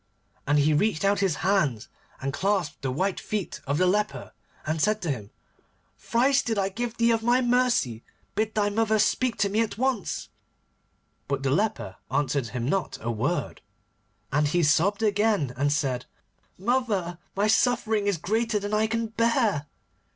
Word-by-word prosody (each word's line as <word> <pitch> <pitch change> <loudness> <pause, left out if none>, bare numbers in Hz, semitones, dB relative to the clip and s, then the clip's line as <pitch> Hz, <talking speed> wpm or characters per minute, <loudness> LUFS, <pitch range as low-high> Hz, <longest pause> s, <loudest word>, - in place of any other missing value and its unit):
And 145 +1 +3
he 150 +1 +3
reached 200 +3 +1
out 200 +1 +3
his 190 -5 +1
hands, 150 - +1 0.3
and 135 +1 -3
clasped 190 -5 -1
the 135 - -2
white 185 +9 -1
feet 210 -4 -4
of 140 +2 0
the 185 - +3
leper, 185 - 0 0.3
and 155 0 -1
said 210 +3 +2
to 165 - 0
him: 105 -7 -5 0.7
'Thrice 265 +4 +2
did 225 -2 -2
I 195 -1 +1
give 235 +3 -4
thee 235 0 +3
of 225 -1 +1
my 240 +2 +3
mercy. 245 - +1 0.3
Bid 215 0 -1
my 205 -1 +2
mother 220 0 +2
speak 230 +3 +1
to 200 - +1
me 215 +3 +2
once.' 255 -4 -1 1.0
But 140 -1 -2
the 135 - +1
leper 135 - -1
answered 140 -3 0
him 120 +2 -4
not 195 +5 -1
a 115 - -2
word. 130 +10 -2 0.7
And 150 +2 +2
he 175 +4 +1
sobbed 190 +8 +2
again 205 - +1
and 145 +3 +1
said: 135 -4 -1 0.5
'Mother, 200 -6 -1 0.2
my 200 +2 +2
suffering 220 -2 +2
is 200 -4 +1
greater 220 +6 0
than 205 +1 -4
I 215 +1 +2
can 230 +1 -1
bear. 225 - +1
200 Hz, 165 wpm, -26 LUFS, 145-220 Hz, 1.0 s, And